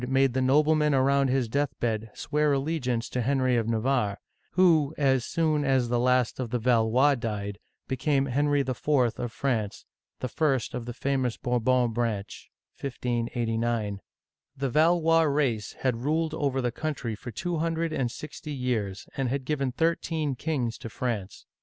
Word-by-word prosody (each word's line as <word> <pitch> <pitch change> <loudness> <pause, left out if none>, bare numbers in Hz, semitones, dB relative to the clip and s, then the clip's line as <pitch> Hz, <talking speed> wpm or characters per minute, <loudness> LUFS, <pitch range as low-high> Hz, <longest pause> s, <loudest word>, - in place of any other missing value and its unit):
made 135 -1 +3
the 130 - +1
noblemen 150 +2 +3
around 135 +1 +3
his 130 -2 +1
deathbed 115 -4 -1
swear 150 0 +1
allegiance 135 -5 -1
to 125 - -2
Henry 130 0 +2
of 115 -2 0
Navarre, 115 -3 +1 0.4
who, 160 -4 +4
as 135 -3 +2
soon 155 -1 +1
as 130 -3 +2
the 120 0 +1
last 125 -1 +2
of 125 -3 -2
the 125 - 0
Valois 120 +4 +3
died, 105 -5 -4 0.3
became 135 +1 +1
Henry 145 +2 +2
IV. 135 - -3 0.5
of 120 - -3
France, 115 -6 -2 0.3
the 130 - -2
first 135 -2 0
of 120 -1 -5
the 120 - -4
famous 130 -2 -1
Bourbon 125 0 +1
branch 110 -4 -3 0.3
(1589). 115 -4 -2 0.6
The 135 0 -1
Valois 165 +2 +4
race 140 -8 0
had 130 -3 +1
ruled 155 +3 0
over 140 -4 -1
the 120 - 0
country 140 -5 -3
for 110 +4 -8
two 170 +9 -3
hundred 165 0 -1
and 130 -5 0
sixty 150 +3 -7
years, 115 -7 -2
and 135 -2 -1
had 135 +1 -2
given 140 -3 -1
thirteen 160 0 0
kings 130 -4 -2
to 115 - -7
France. 110 -5 -4
130 Hz, 155 wpm, -27 LUFS, 120-145 Hz, 0.6 s, who